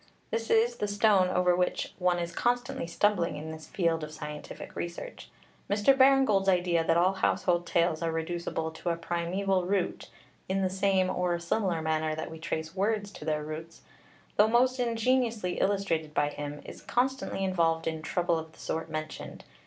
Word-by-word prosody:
This 225 Hz, 0 st, -2 dB
is 235 Hz, +2 st, +3 dB
the 210 Hz, -, -1 dB
stone 205 Hz, -2 st, +4 dB
over 180 Hz, -1 st, +3 dB
which 180 Hz, 0 st, -1 dB
one 180 Hz, -1 st, +2 dB
is 170 Hz, 0 st, -3 dB
constantly 245 Hz, 0 st, -1 dB
stumbling 175 Hz, 0 st, +1 dB
in 155 Hz, +2 st, -6 dB
this 160 Hz, 0 st, -9 dB
field 165 Hz, -3 st, 0 dB
of 155 Hz, -, -6 dB
scientific 150 Hz, -1 st, -8 dB
research. 175 Hz, -, -6 dB, 0.4 s
Mr. 205 Hz, +7 st, +4 dB
Baring 270 Hz, 0 st, +6 dB
Gould's 195 Hz, -4 st, +2 dB
idea 175 Hz, -2 st, +2 dB
that 165 Hz, +1 st, +2 dB
all 180 Hz, +3 st, +4 dB
household 175 Hz, -2 st, +1 dB
tales 170 Hz, -1 st, +1 dB
are 165 Hz, -1 st, 0 dB
reducible 165 Hz, 0 st, -3 dB
to 160 Hz, +2 st, -4 dB
a 170 Hz, -, +1 dB
primeval 175 Hz, +3 st, -1 dB
root 195 Hz, -2 st, -1 dB, 0.4 s
(in 195 Hz, 0 st, +1 dB
the 185 Hz, -, 0 dB
same 190 Hz, -1 st, +2 dB
or 180 Hz, -1 st, 0 dB
a -, -, -4 dB
similar 170 Hz, -1 st, -1 dB
manner 155 Hz, 0 st, 0 dB
that 160 Hz, -, -5 dB
we 160 Hz, -, -8 dB
trace 160 Hz, 0 st, -4 dB
words 205 Hz, +1 st, 0 dB
to 150 Hz, -, -10 dB
their 155 Hz, -1 st, 0 dB
roots), 155 Hz, +2 st, -7 dB, 0.6 s
though 210 Hz, -, +6 dB
most 250 Hz, +3 st, +3 dB
ingeniously 230 Hz, -4 st, +1 dB
illustrated 170 Hz, -6 st, 0 dB
by 145 Hz, -, +2 dB
him, 145 Hz, 0 st, -6 dB
is -, -, -10 dB
constantly 260 Hz, -5 st, -1 dB
involved 165 Hz, -3 st, +1 dB
in 160 Hz, -1 st, -2 dB
trouble 170 Hz, +1 st, 0 dB
of 160 Hz, 0 st, -9 dB
the -, -, -20 dB
sort 160 Hz, 0 st, -3 dB
mentioned. 155 Hz, 0 st, -6 dB
180 Hz, 180 wpm, -29 LUFS, 160-205 Hz, 0.6 s, Baring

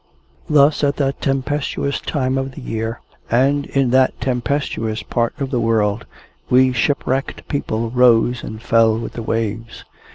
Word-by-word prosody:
Thus, 150 Hz, 0 st, +4 dB
at 140 Hz, 0 st, +2 dB
that 135 Hz, -1 st, -1 dB
tempestuous 140 Hz, +1 st, -1 dB
time 130 Hz, -3 st, -1 dB
of 135 Hz, 0 st, -2 dB
the 145 Hz, -, -9 dB
year, 115 Hz, -1 st, -4 dB, 0.3 s
and 140 Hz, +4 st, +2 dB
in 135 Hz, -3 st, +1 dB
that 130 Hz, 0 st, +3 dB
tempestuous 125 Hz, -4 st, -2 dB
part 120 Hz, +4 st, -2 dB
of 135 Hz, -2 st, -3 dB
the 125 Hz, -, 0 dB
world, 110 Hz, -2 st, 0 dB, 0.4 s
we 130 Hz, +1 st, +4 dB
shipwrecked 135 Hz, +2 st, -1 dB
people 115 Hz, -6 st, -2 dB
rose 120 Hz, -1 st, +3 dB
and 110 Hz, +1 st, -8 dB
fell 115 Hz, -1 st, +3 dB
with 115 Hz, -, -6 dB
the 115 Hz, -, -5 dB
waves. 115 Hz, 0 st, -3 dB
125 Hz, 150 wpm, -19 LUFS, 115-135 Hz, 0.4 s, Thus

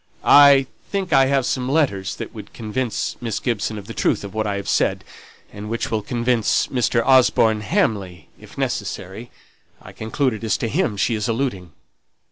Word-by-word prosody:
"I 140 Hz, -1 st, +7 dB, 0.2 s
think 190 Hz, -5 st, -2 dB
I 135 Hz, -1 st, +5 dB
have 135 Hz, -2 st, +1 dB
some 125 Hz, 0 st, -2 dB
letters 115 Hz, -, 0 dB
that -, -, -7 dB
would -, -, -11 dB
convince 115 Hz, +2 st, -3 dB
Miss 115 Hz, -4 st, -3 dB
Gibson 110 Hz, -3 st, -2 dB
of 100 Hz, -, -8 dB
the 115 Hz, -, -8 dB
truth -, -, 0 dB
of 100 Hz, -, -8 dB
what 110 Hz, 0 st, -1 dB
I 100 Hz, -, -1 dB
have 100 Hz, -, -5 dB
said; -, -, +1 dB, 0.5 s
and 105 Hz, +1 st, -8 dB
which 115 Hz, +1 st, -3 dB
will 110 Hz, -1 st, 0 dB
convince 120 Hz, 0 st, 0 dB
Mr. 120 Hz, -2 st, 0 dB
Osborne 120 Hz, -4 st, +4 dB
Hamley, 105 Hz, -, -1 dB
if -, -, -15 dB
necessary 105 Hz, +7 st, -4 dB, 0.5 s
I -, -, -13 dB
conclude 120 Hz, +4 st, -1 dB
it 110 Hz, -, -8 dB
is 110 Hz, -, 0 dB
to 115 Hz, -, -2 dB
him 125 Hz, -, -1 dB
she 115 Hz, -, +1 dB
is 105 Hz, -2 st, -2 dB
alluding." 115 Hz, -, -3 dB
115 Hz, 180 wpm, -21 LUFS, 105-130 Hz, 0.5 s, I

